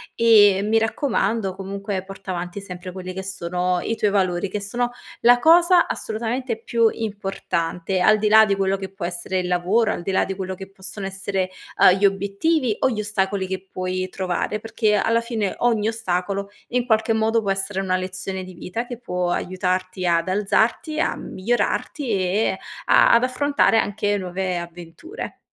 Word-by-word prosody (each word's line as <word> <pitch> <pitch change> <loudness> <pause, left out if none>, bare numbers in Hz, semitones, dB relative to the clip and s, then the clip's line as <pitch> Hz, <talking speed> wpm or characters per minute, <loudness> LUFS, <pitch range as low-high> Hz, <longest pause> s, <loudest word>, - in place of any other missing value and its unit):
e, 205 -4 +6
mi 215 +2 +2
raccomando, 220 -3 0
comunque 195 0 -4
porta 195 0 -8
avanti 175 +2 -4
sempre 180 -1 -8
quelli 185 0 -7
che 190 +1 -5
sono 180 -1 -1
i 225 - -2
tuoi 210 -2 +1
valori, 185 -1 0
che 205 +1 -4
sono 240 +4 -2 0.3
la 245 +1 +6
cosa 345 +4 +5
assolutamente 230 +1 -3
più 230 -1 +3
importante, 190 -4 -3
al 215 +4 +5
di 215 - +1
là 220 +1 +7
di 200 -1 +1
quello 195 0 +1
che 190 0 -6
può 195 -3 -5
essere 175 +2 -3
il 180 - -2
lavoro, 190 +6 +2
al - - -5
di 190 - -3
là 190 - +2
di 195 0 -4
quello 190 -1 -4
che 190 +1 -10
possono 195 0 -8
essere, 195 -1 -2 0.3
uhm, - - +7
gli 200 - +3
obiettivi 200 - +1
o - - +3
gli 225 -4 -3
ostacoli 195 -2 -1
che 190 0 -5
puoi 185 0 -3
trovare. 185 +3 -2
Perché 215 -1 0
alla 230 +3 +2
fine 225 -4 -2
ogni 225 -3 +2
ostacolo, 200 -2 -2 0.2
in 245 0 0
qualche 220 -1 +2
modo, 225 +1 +2
può 200 -2 -1
essere 195 0 -2
una 185 -1 0
lezione 185 0 -4
di 185 - -10
vita 205 +7 -5
che 245 -1 -7
può 180 -6 -2
aiutarti 185 0 -2
ad 170 0 +2
alzarti, 220 - +1
a - - +1
migliorarti 240 +6 -2
e 195 +2 +1 0.3
a - - +6
ad 235 +1 +5
affrontare 255 -1 +2
anche 205 -1 0
nuove 185 -1 -3
avventure. 175 - -8
195 Hz, 175 wpm, -22 LUFS, 185-225 Hz, 0.3 s, là